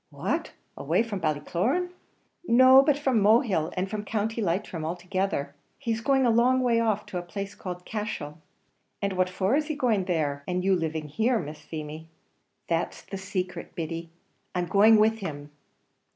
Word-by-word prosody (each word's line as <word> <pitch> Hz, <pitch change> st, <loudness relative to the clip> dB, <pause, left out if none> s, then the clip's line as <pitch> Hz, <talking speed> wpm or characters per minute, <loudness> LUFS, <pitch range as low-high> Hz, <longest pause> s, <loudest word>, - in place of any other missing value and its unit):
"What! -, -, -3 dB, 0.2 s
away -, -, +1 dB
from 215 Hz, -4 st, -4 dB
Ballycloran?" 180 Hz, -, 0 dB, 0.6 s
"No, 260 Hz, +2 st, +8 dB
but 285 Hz, 0 st, +2 dB
from 265 Hz, -6 st, +1 dB
Mohill, 205 Hz, -, +3 dB
and 185 Hz, +1 st, 0 dB
from 210 Hz, +1 st, -4 dB
County 220 Hz, +2 st, -2 dB
Leitrim 175 Hz, -3 st, -2 dB
altogether. 175 Hz, -3 st, -2 dB, 0.2 s
He's 230 Hz, -4 st, -2 dB
going 270 Hz, +1 st, +3 dB
a 235 Hz, -, +4 dB
long 250 Hz, +3 st, +4 dB
way 235 Hz, -2 st, +3 dB
off, 215 Hz, -2 st, 0 dB
to 180 Hz, -, -4 dB
a -, -, -4 dB
place 200 Hz, +3 st, -6 dB
called 180 Hz, -1 st, -7 dB
Cashel." 205 Hz, -9 st, -5 dB, 0.6 s
"And 200 Hz, -1 st, -1 dB
what 185 Hz, 0 st, +1 dB
for 190 Hz, +6 st, +1 dB
is 300 Hz, 0 st, 0 dB
he 310 Hz, -, -2 dB
going 230 Hz, -9 st, +1 dB
there, 150 Hz, -6 st, -1 dB
and 180 Hz, 0 st, -1 dB
you 195 Hz, 0 st, +3 dB
living 160 Hz, -3 st, -2 dB
here, 225 Hz, -, +1 dB
Miss 150 Hz, -5 st, -6 dB
Feemy?" 155 Hz, +1 st, -7 dB, 0.6 s
"That's 165 Hz, 0 st, -2 dB
the 195 Hz, -, -7 dB
secret, 185 Hz, -1 st, -4 dB
Biddy; 165 Hz, 0 st, -4 dB, 0.5 s
I'm 180 Hz, -1 st, 0 dB
going 215 Hz, +4 st, +6 dB
with 220 Hz, +1 st, +3 dB
him." 145 Hz, -6 st, -6 dB
195 Hz, 165 wpm, -27 LUFS, 165-230 Hz, 0.6 s, No